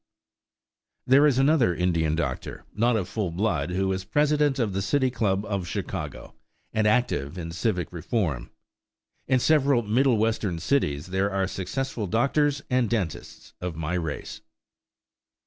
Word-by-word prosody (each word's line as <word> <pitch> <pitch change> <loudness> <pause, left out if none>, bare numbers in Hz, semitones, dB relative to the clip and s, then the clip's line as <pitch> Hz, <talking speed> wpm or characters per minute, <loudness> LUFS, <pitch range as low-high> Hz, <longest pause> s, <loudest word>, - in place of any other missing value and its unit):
There 140 +4 +6
is 135 -4 +2
another 135 - +3
Indian 85 -3 +1
doctor, 75 -6 -4
not 120 +3 +2
of 100 -5 -1
full 105 -3 -2
blood, 85 -4 -1
who 95 +1 0
is 95 0 -3
president 145 +5 +2
of 115 -6 0
the 95 - -1
City 130 +5 +1
Club 100 -4 0
of 100 -4 -3
Chicago - - -5 0.4
and 110 -1 +2
active 105 - +1
in 85 -2 -5
civic 90 -2 -2
reform. 85 - -2 0.8
In 130 - +3
several 140 -3 +3
Middle 120 +3 +3
Western 110 -5 0
cities 75 - 0
there 95 +2 0
are 95 -1 0
successful 105 +5 -3
doctors 140 - +1
and 125 -3 +1
dentists 100 -9 -4
of 90 -2 -4
my 80 +1 -3
race. 80 -5 -4
105 Hz, 145 wpm, -26 LUFS, 90-130 Hz, 0.8 s, There